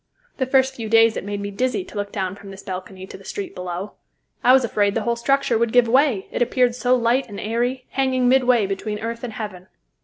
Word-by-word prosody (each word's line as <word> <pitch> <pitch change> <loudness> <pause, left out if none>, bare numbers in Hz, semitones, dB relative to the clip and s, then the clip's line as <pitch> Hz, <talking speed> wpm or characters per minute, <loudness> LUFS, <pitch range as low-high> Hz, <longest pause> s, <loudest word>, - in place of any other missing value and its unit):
The 260 - -1
first 265 0 +3
few 225 -4 -6
days 225 0 +5
it - - -4
made 205 0 -4
me 200 0 -4
dizzy 255 - -1
to - - -14
look 205 0 -3
down 190 -2 -3
from 200 0 -12
this 195 0 -10
balcony 185 0 -7
to - - -10
the - - -15
street 200 +1 -6
below. 180 +2 -5 0.5
I 250 - +6
was 260 0 +6
afraid 205 -3 +1
the 225 - 0
whole 235 +2 0
structure 240 -1 +1
would 235 -1 +1
give 245 -1 +5
way, 255 -4 +3
it - - -3
appeared 245 0 +2
so 250 +1 +2
light 240 +1 +1
and 200 - -7
airy, 245 +4 -2
hanging 260 -2 +1
midway 250 -4 +4
between 200 +2 -3
earth 230 +2 -5
and 240 -3 -5
heaven. 195 -4 -7
230 Hz, 235 wpm, -22 LUFS, 200-250 Hz, 0.5 s, I